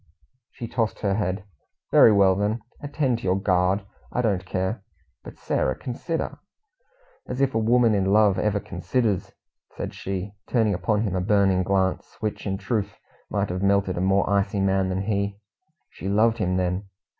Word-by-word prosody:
She 120 - -7
tossed 115 -1 -2
her 100 -2 +1
head. 95 -2 -1 0.5
"Very - - +8
well, 100 -2 +5
then, 105 +4 -1 0.2
attend 140 -4 -1
to - - -14
your 95 +1 +1
guard; 95 0 +1 0.3
I 125 - -1
don't 95 -5 0
care." 95 +4 -2 0.4
"But, - - -11
Sarah, 65 - 0
consider 160 +6 -4 0.4
" - - -35
"As 125 - -3
if 135 -1 +2
a 115 - +1
woman 115 0 +4
in 100 -2 +1
love 100 0 +4
ever 105 -1 +1
considers!" 100 +3 -1 0.4
said - - -4
she, 95 +1 -5
turning 110 -4 +2
upon 100 +4 0
him 100 -5 -1
a 90 - 0
burning 95 -2 +3
glance, 95 0 -1
which 110 -1 -3
in 95 0 -1
truth 110 -1 -2 0.3
might 100 -1 -1
have 90 +1 -3
melted 100 -1 +2
a 85 - -2
more 95 +1 +2
icy 100 0 +1
man 95 -1 +1
than 95 +1 -1
he. 100 -1 -1 0.5
She 95 - -6
loved 110 +3 +3
him 90 -3 0
then! 90 +2 -1
100 Hz, 175 wpm, -24 LUFS, 95-110 Hz, 0.5 s, Very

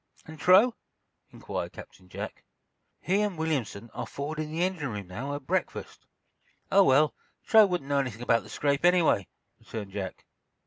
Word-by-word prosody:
"And 160 -1 -11
Truax?" 200 +9 +6 0.5
inquired - - -5
Captain 90 - -13
Jack. - - -7 0.6
"He 195 +3 +1
and 205 -5 -1
Williamson 130 -9 -2
are - - -5
forward 150 +3 -5
in 155 0 -3
the 165 +2 0
engine 180 -7 -1
room, 105 -3 -5
now, 135 +11 -5
at 145 - -8
breakfast." 185 +5 -3 0.6
"Oh, 200 0 +7
well, 150 0 +4 0.3
Truax 220 -2 +6
wouldn't 175 -7 -2
know 140 - +3
anything 120 -4 -3
about 115 -1 +3
the - - -14
scrape, 140 0 0
anyway," 175 - +4 0.3
returned 105 -4 -7
Jack. 95 -2 -6
150 Hz, 165 wpm, -28 LUFS, 115-180 Hz, 0.6 s, Oh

